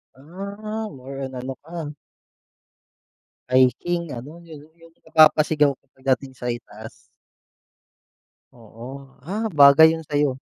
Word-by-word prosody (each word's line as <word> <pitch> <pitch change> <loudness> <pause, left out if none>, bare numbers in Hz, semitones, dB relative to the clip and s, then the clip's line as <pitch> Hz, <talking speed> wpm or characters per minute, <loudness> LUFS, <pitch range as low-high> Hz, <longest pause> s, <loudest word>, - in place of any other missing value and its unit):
Ah, 200 +9 -7
more 135 +1 -9
on 130 0 -9
ano 130 +2 -5
ka 165 +3 -11 1.7
hiking 145 +7 +1
ano 145 +8 -9
yun 155 -3 -13
yung 160 - -33 0.2
yung - - -33
napapasigaw 155 -2 +4
ka 135 - -14
'pag 130 - -24
dating 135 -1 -12
sa 125 -1 -3
itaas. 110 -2 -9 1.6
Oo, 115 0 -12 0.4
ah 210 +5 -3
bagay 145 +1 +7
yun 160 0 -4
sa'yo. 145 -3 0
145 Hz, 120 wpm, -22 LUFS, 130-165 Hz, 1.7 s, bagay